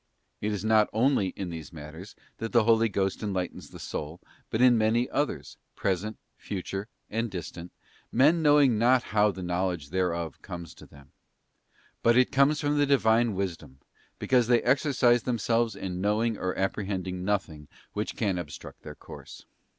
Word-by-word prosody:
It 105 - -1
is 105 0 -3
not 110 -1 +4
only 115 -2 +2
in 95 -3 -5
these 80 -3 -8
matters 80 +5 -10 0.2
that 115 - -4
the 120 -2 +5
Holy 115 0 +4
Ghost 95 -1 -1
enlightens 95 -4 -4
the - - -11
soul, 75 +3 -6 0.3
but 110 - -2
in 125 -1 +6
many 115 +2 +2
others, 145 +2 -2 0.2
present, 100 +3 -2 0.2
future, 100 +1 -5 0.2
and 115 +2 -1
distant—men 100 - -1
knowing 145 -7 +5
not 125 +2 +4
how 105 0 +4
the 95 -2 -5
knowledge 90 -4 -2
thereof 85 -4 -2
comestothem. 85 -5 -10 0.9
Butit 120 +2 +4
comes 140 +2 +3
from 145 0 0
the 145 - +3
Divine 115 -5 +3
Wisdom, 85 -8 -4 0.4
because 125 -3 +2
they 120 -1 +3
exercise 125 -2 +3
themselves 115 -2 0
in 90 -2 -5
knowing 110 +3 +1
or 95 -2 -3
apprehend 95 -1 -2
ing 90 0 -4
nothing, 90 -7 -2 0.3
which 105 0 -3
can 100 -5 0
obstruct 75 -4 -9
their - - -9
course. - - -12
105 Hz, 150 wpm, -28 LUFS, 90-120 Hz, 0.9 s, in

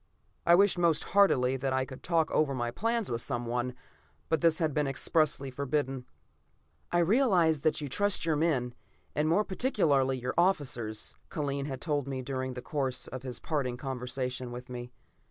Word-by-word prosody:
I 170 - +8
wished 195 -1 +4
most 170 -3 +3
heartily 135 -11 +4
that 135 0 -1
I 130 0 +1
could 130 -1 -10
talk 165 -2 +1
over 145 -3 +2
my 120 -1 -2
plans 230 - -1
with 115 0 -1
someone, 120 0 -2 0.5
but 160 -3 +1
this 165 -1 +4
had 160 -3 0
been 150 0 +1
expressly 140 0 +1
forbidden. 135 -1 -2 0.8
"I 175 - +2
realize 175 - +3
that 155 0 +1
you 145 - -3
trust 200 +6 +1
your 160 -2 +2
men, 145 -6 +1 0.4
and 155 +1 +1
more 190 +6 +3
particularly 155 - +1
your 125 0 -3
officers," 125 - 0
Kellen 140 -2 -2
had 135 -2 -5
told 145 -4 -1
me 130 -1 -3
during 130 -1 -3
the 125 - -6
course 135 -4 -1
of 130 - -6
his 125 -3 -5
parting 135 -6 -2
conversation 125 -1 -4
with 125 +1 -8
me. 125 0 -7
140 Hz, 175 wpm, -30 LUFS, 125-165 Hz, 0.8 s, I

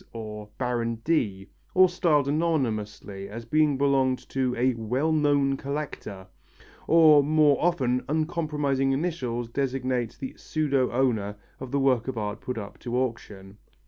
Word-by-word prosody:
or 105 -2 -7
Baron 120 -2 -1
D., 100 -12 0 0.3
or 185 0 +7
styled 170 -6 +1
anonymously, 110 -11 -2
as 115 +3 -7
having 150 +3 +2
belonged 135 -2 +1
to 130 -2 -1
a 130 +2 +2
"well 125 +7 -1
known 145 -3 +2
collector," 140 -9 -5 0.6
or 160 -3 +7
more 150 0 +4
often 130 -8 +1
uncompromising 150 -4 0
initials 135 -7 -2
designate 130 -2 -2
the 135 -2 -5
pseudo 140 -5 0
owner 115 -5 0 0.2
of 130 - -7
the 140 +2 0
works 130 -4 +2
of 130 -3 -4
art 105 0 -3
put 125 -2 -4
up 105 -1 -7
to 120 0 -3
auction. 105 -6 -4
130 Hz, 140 wpm, -26 LUFS, 115-150 Hz, 0.6 s, or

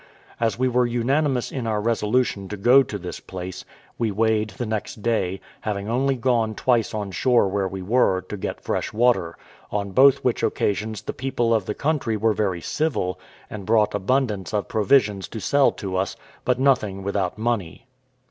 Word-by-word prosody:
As 115 -3 0
we 130 +1 +2
were 125 0 +2
unanimous 130 +2 0
in 125 -4 -3
our 110 -1 0
resolution 110 -2 0
to 105 - -5
go 125 +7 +6
to 110 -6 -4
this 90 -2 -7
place, 90 0 -7 0.4
we 115 -2 +1
weighed 110 +1 +1
the 105 +5 -5
next 110 -1 -4
day, 95 -5 0 0.2
having 100 -1 -3
only 135 +4 +1
gone 120 -3 +1
twice 120 -3 +1
on 105 -2 -3
shore 120 +2 +3
where 95 0 0
we 95 0 -6
were, 100 -3 +2
to 95 +3 -7
get 95 - -5
fresh - - -2
water; 110 -7 +1 0.3
on 100 -1 -2
both 140 +5 +5
which 125 - +1
occasions 105 +1 -1
the - - -4
people 120 -3 0
of 110 -4 0
the 105 - -2
country 140 -7 0
were 110 +1 +2
very 95 -5 -1
civil, 95 - -1 0.3
and 100 -3 -8
brought 110 -2 +3
abundance 105 -2 0
of 105 - -1
provisions 105 -4 +2
to 110 - -7
sell 140 +5 +3
to 95 -3 -5
us; 95 0 -1 0.3
but 125 -1 +2
nothing 110 -8 +2
without 100 -1 -1
money. 110 -4 -2
110 Hz, 180 wpm, -23 LUFS, 100-125 Hz, 0.4 s, go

